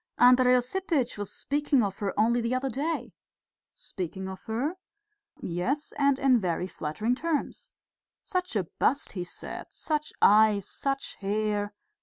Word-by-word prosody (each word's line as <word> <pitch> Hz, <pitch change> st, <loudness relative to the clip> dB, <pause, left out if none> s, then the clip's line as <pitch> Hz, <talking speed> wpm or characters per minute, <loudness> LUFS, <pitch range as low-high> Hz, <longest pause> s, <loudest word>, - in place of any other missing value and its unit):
Andrey 250 Hz, 0 st, +6 dB
Osipitch 265 Hz, 0 st, 0 dB
was 205 Hz, -, -4 dB
speaking 285 Hz, -3 st, +1 dB
of 195 Hz, -1 st, -3 dB
her 200 Hz, -2 st, -1 dB
only 235 Hz, +3 st, +3 dB
the 235 Hz, +2 st, 0 dB
other 260 Hz, +1 st, -1 dB
day." 305 Hz, +7 st, -2 dB, 0.6 s
"Speaking 190 Hz, +1 st, -6 dB
of 190 Hz, 0 st, -8 dB
her?" 245 Hz, +9 st, -1 dB, 0.7 s
"Yes, 215 Hz, -, -2 dB
and 280 Hz, -1 st, +3 dB
in 265 Hz, -3 st, +4 dB
very 180 Hz, -2 st, -1 dB
flattering 190 Hz, +7 st, -2 dB
terms. 305 Hz, +3 st, -2 dB, 0.5 s
Such 365 Hz, -6 st, -2 dB
a 200 Hz, -, +2 dB, 0.2 s
bust, 280 Hz, -, +2 dB
he 180 Hz, -3 st, -4 dB
said, 175 Hz, -, -7 dB
such 305 Hz, -1 st, -2 dB
eyes, 210 Hz, -1 st, +5 dB
such 275 Hz, 0 st, -3 dB
hair.... 205 Hz, 0 st, -1 dB
240 Hz, 140 wpm, -28 LUFS, 205-280 Hz, 0.7 s, Andrey